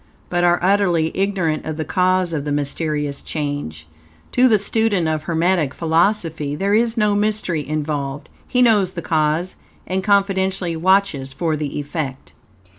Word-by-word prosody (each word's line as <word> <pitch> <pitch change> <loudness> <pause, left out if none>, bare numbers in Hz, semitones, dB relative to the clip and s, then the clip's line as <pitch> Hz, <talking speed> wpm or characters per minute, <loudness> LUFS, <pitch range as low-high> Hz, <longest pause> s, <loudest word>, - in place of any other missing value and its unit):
but 175 0 +1
are 175 0 +4
utterly 180 -4 +2
ignorant 190 -5 0
of 155 -1 -5
the 155 - -3
cause 185 0 +1
of 150 -3 -2
the 145 - -3
mysterious 145 0 -2
change. 145 - -4 0.5
To 255 +1 +4
the 220 -3 +5
student 205 -4 0
of 155 -1 -1
Hermetic 165 -3 +1
Philosophy 165 -3 0
there 195 +6 0
is 230 +2 +2
no 210 -2 +3
mystery 205 -7 -1
involved. 145 -2 -3 0.2
He 250 0 +3
knows 205 -6 +3
the 170 - -6
cause, 160 +3 0 0.3
and 190 +1 -2
confidently 190 -3 +1
watches 170 -6 +1
for 160 +2 -1
the 150 -2 -4
effect. 145 -2 -5
170 Hz, 150 wpm, -20 LUFS, 150-195 Hz, 0.5 s, the